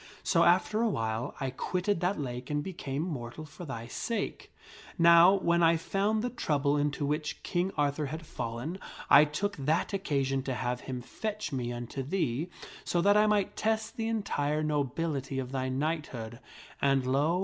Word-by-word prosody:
So, - - +3
after 220 +1 +3
a 235 - +3
while, 110 - -2
I 135 -1 -2
quitted 180 +8 -1
that 180 0 0
lake 125 -2 -5
and 145 0 0
became 150 -5 -4
mortal 145 -3 -5
for 155 +4 -10
thy 115 -6 -5
sake. 210 - -4 0.5
Now, 170 +2 +8
when 170 -3 +2
I 165 0 +5
found 205 +6 0
the 245 - -1
trouble 145 - +1
into 145 0 0
which 150 +1 -2
King 180 +2 0
Arthur 145 0 +1
had 160 +3 -6
fallen 125 +7 -4 0.3
1 145 +1 +8
took 205 +6 -2
that 155 +8 0
occasion 135 -8 0
to 130 -1 -3
have 125 0 -2
him 125 -2 -4
fetch 215 - -4
me 125 -3 -2
unto 120 +2 -5
thee 145 0 -1 0.3
so 175 - 0
that 200 +3 +5
I 210 0 +5
might 210 -2 +1
test 220 0 -1
the 225 -1 -2
entire 155 -9 0
nobility 145 -1 -1
of 130 -1 -3
thy 130 -1 -1
knighthood; 130 -5 -3 0.4
and, 135 -2 +3
lo 145 +7 +2
150 Hz, 170 wpm, -30 LUFS, 135-180 Hz, 0.5 s, Now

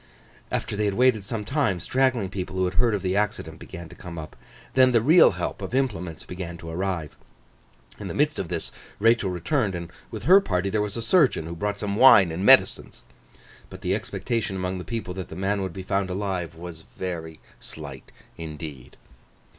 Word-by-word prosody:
After - - -2
they 105 +1 0
had 100 -1 0
waited 125 -4 +3
some 105 +1 -4
time, 130 - 0
straggling 130 -1 +1
people 95 -1 -5
who 95 0 +1
had 90 - -2
heard 115 +2 +3
of 100 - -4
the 95 0 0
accident 85 -6 -1
began 85 -3 -9
to - - -13
come 85 -2 -9
up; 75 -1 -8 0.4
then 130 -1 +5
the 115 - +6
real 155 +10 +6
help - - -4
of - - -4
implements 90 - -1
began 90 -2 -6
to 80 0 -8
arrive. 90 -3 -3 0.8
In - - -6
the - - -5
midst - - +1
of - - -2
this, - - -3 0.3
Rachael 115 -2 +3
returned; 95 - 0
and 85 -1 -6 0.2
with 110 -3 -7
her 190 +9 +7
party 95 - -1
there 110 - +1
was 105 +1 -3
a 115 - -3
surgeon, 140 - +3
who 85 +1 -6
brought 105 +3 -2
some 100 -1 -2
wine 100 -9 +8
and 85 +4 -3
medicines. - - +4 0.7
But, - - -11
the - - 0
expectation 115 -5 -2
among 90 0 -2
the 90 - -7
people 115 -6 -4
that 95 -2 -6
the - - -8
man 100 +2 0
would 95 -2 -3
be 95 +2 -7
found 95 0 -1
alive 90 -3 -3
was 85 -1 -9
very 80 -3 -6 0.2
slight 70 -4 -7 0.3
indeed. 75 -4 -8
95 Hz, 200 wpm, -25 LUFS, 85-110 Hz, 0.8 s, wine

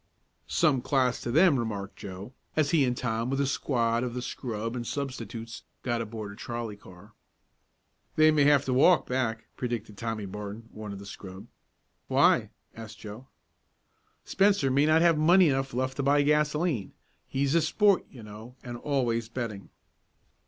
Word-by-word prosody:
"Some 145 -7 +2
class 130 -2 +1
to - - -4
them," 155 +1 +4
remarked 105 -4 -4
Joe, 100 +3 -9 0.2
as 155 -2 +2
he 150 -5 +4
and 125 -1 -1
Tom 115 0 -2
with 135 +1 -1
a 140 - +2
squad 120 -3 0
of 125 -1 -4
the 125 - -3
scrub 115 -2 -4
and 120 -2 -4
substitutes, 115 -5 -5 0.2
got 120 -2 -1
aboard 110 -2 -6
a - - -11
trolley 120 -2 -5
car. 100 +1 -16 1.0
"They 155 0 +6
may 150 -2 +3
have 145 -1 +4
to 130 - 0
walk 155 +7 +5
back," 115 -3 -2
predicted 115 -4 -4
Tommy 115 -3 -3
Barton, 105 +3 -7
one 105 -1 -8
of 100 - -6
the 100 - -10
scrub. 95 -1 -10 0.6
"Why?" - - +3 0.3
asked 110 -1 -9
Joe. 110 +5 -10 1.0
"Spencer 195 -8 +2
may 140 +3 +3
not 160 +1 +4
have 165 -3 +4
money 175 +2 +6
enough 135 -1 -1
left 130 +2 -2
to - - 0
buy 145 +1 +3
gasolene. 150 - +1 0.3
He's 140 +1 0
a 170 - +4
sport, 195 +5 +3
you 120 -4 -12
know, 110 +4 -11
and 120 -1 -6
always 120 -4 -1
betting." 115 -5 -5
125 Hz, 165 wpm, -28 LUFS, 110-140 Hz, 1.0 s, They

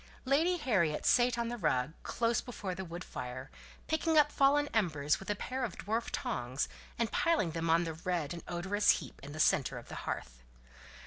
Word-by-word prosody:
Lady 320 +7 +3
Harriet 190 - +1
sate 245 -1 +4
on 235 0 -1
the 240 0 -4
rug, 130 -3 +1
close 230 -1 0
before 205 -6 -5
the 190 - -5
wood 175 0 -7
fire, 125 +1 -6 0.3
picking 315 0 +1
up 295 -1 +6
fallen 290 +1 +4
embers 155 -9 +1
with 195 - -9
a 205 - +1
pair 260 +5 -3
of 225 -7 -3
dwarf 225 +3 -2
tongs, 125 +2 -2 0.3
and 230 -1 0
piling 330 - +2
them 165 +1 -2
on 165 +1 +4
the 165 -1 -3
red 165 -1 -2
and 170 - -6
odorous 195 +4 0
heap 145 -7 -9
in 140 +1 -9
the 155 - -7
centre 135 -4 +3
of 120 - -10
the - - -6
hearth. - - -5
190 Hz, 195 wpm, -33 LUFS, 155-245 Hz, 0.3 s, up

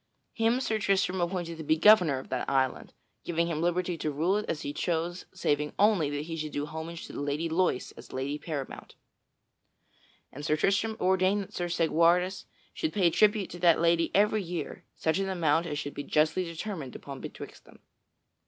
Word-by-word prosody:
Him 230 +2 +2
Sir 220 -4 0
Tristram 190 -2 +1
appointed 175 -2 -3
to - - -5
be 155 +1 +2
governor 180 -6 +6
of 130 - -8
that 130 - -2
island, 130 -1 0 0.3
giving 170 0 0
him 165 -2 -2
liberty 175 0 0
to 155 - -1
rule 160 +7 +1
it 210 - -4
as 150 - -2
he 145 - -4
chose 170 +3 -2
saving 150 -5 -1
only 200 -8 +3
that 145 0 -3
he 165 +1 -5
should 155 -2 -5
do 145 0 -2
homage 160 +2 -7
to - - -11
the - - -4
Lady 145 +3 -1
Loise 165 -5 0
as 115 0 -13
lady 140 +3 -3
paramount. 145 -5 -6 1.4
And 145 - -9
Sir 155 0 +2
Tristram 210 +6 +1
ordained 190 +2 +2
that - - -15
Sir 175 - -2
Segwarides 170 +3 +2 0.3
should 320 - -2
pay 185 -5 +3
tribute 210 +1 +3
to 175 - -8
that 170 -2 +5
lady 170 0 +3
every 210 +2 +3
year 175 -2 -5
such 160 +4 0
an 195 0 -1
amount 170 -2 +1
as 150 -2 -3
should 145 0 -4
be - - -5
justly 155 +5 +1
determined 165 - -6
upon 135 -2 -8
betwixt - - -9
them. - - -17
170 Hz, 190 wpm, -29 LUFS, 150-185 Hz, 1.4 s, governor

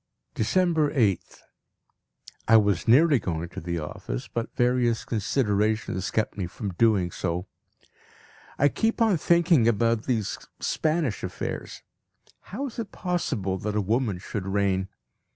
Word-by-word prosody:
December 160 - +2
8th. 105 - 0 1.1
I 115 - +7
was 100 -4 +1
nearly 140 +4 +6
going 85 -3 -3
to - - -8
the 85 +1 -3
office, 75 -6 -5
but 115 -1 -3
various 120 -2 +1
considerations 110 -3 0
kept 110 - -1
me 95 -4 -3
from 100 +2 -5
doing 100 -3 +2
so. 85 +3 -3 1.1
I 145 - +4
keep 225 +9 0
on 220 -6 +4
thinking 170 -7 +3
about 115 0 +2
these 115 -6 -1 0.2
Spanish 155 -8 -1
affairs. - - -5 0.7
How 255 +9 -4
is 250 -3 -7
it 225 - -5
possible 130 - -2
that 105 +2 -3
a - - +2
woman 110 0 0
should 95 +1 -5
reign? 95 -1 +1
110 Hz, 135 wpm, -26 LUFS, 95-145 Hz, 1.1 s, I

